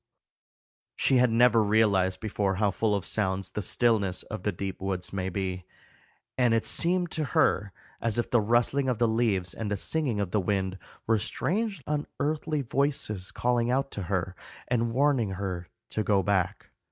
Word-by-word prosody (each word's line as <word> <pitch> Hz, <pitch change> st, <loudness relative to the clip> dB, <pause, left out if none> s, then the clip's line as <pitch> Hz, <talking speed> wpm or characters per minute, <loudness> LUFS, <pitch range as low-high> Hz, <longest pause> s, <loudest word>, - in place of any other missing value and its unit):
She 130 Hz, -, +3 dB
had 125 Hz, 0 st, +4 dB
never 115 Hz, 0 st, +5 dB
realized 100 Hz, -3 st, +2 dB
before 100 Hz, -2 st, -1 dB
how 100 Hz, +1 st, +2 dB
full 105 Hz, +2 st, +1 dB
of 100 Hz, -, -3 dB
sounds 95 Hz, -2 st, -1 dB
the 105 Hz, -, -3 dB
stillness 105 Hz, -2 st, +1 dB
of -, -, -7 dB
the 105 Hz, -, 0 dB
deep 95 Hz, +1 st, -5 dB
woods 95 Hz, -1 st, -3 dB
may 95 Hz, -1 st, -2 dB
be, 95 Hz, -1 st, -3 dB, 0.8 s
and 120 Hz, -2 st, +4 dB
it 115 Hz, -, 0 dB
seemed 175 Hz, 0 st, +1 dB
to 155 Hz, -, -1 dB
her 100 Hz, +1 st, +3 dB, 0.3 s
as 115 Hz, -1 st, 0 dB
if 120 Hz, -, -1 dB
the 120 Hz, -, +4 dB
rustling 120 Hz, +5 st, +2 dB
of 125 Hz, -, 0 dB
the 120 Hz, -, +3 dB
leaves 110 Hz, -6 st, 0 dB
and 110 Hz, -2 st, -4 dB
the 105 Hz, -, -1 dB
singing 135 Hz, -1 st, 0 dB
of 100 Hz, -3 st, -2 dB
the 105 Hz, -, +1 dB
wind 95 Hz, 0 st, -1 dB, 0.3 s
were 110 Hz, -1 st, +2 dB
strange 195 Hz, -, -2 dB
unearthly 150 Hz, 0 st, -2 dB
voices 125 Hz, -8 st, -1 dB
calling 120 Hz, -1 st, 0 dB
out 135 Hz, +2 st, 0 dB
to 100 Hz, -, -5 dB
her 95 Hz, 0 st, -2 dB, 0.3 s
and 120 Hz, -1 st, 0 dB
warning 130 Hz, -5 st, +2 dB
her 90 Hz, -2 st, -4 dB, 0.2 s
to 110 Hz, -, -1 dB
go 100 Hz, -2 st, +2 dB
back. 95 Hz, -3 st, -1 dB
110 Hz, 175 wpm, -28 LUFS, 95-125 Hz, 0.8 s, never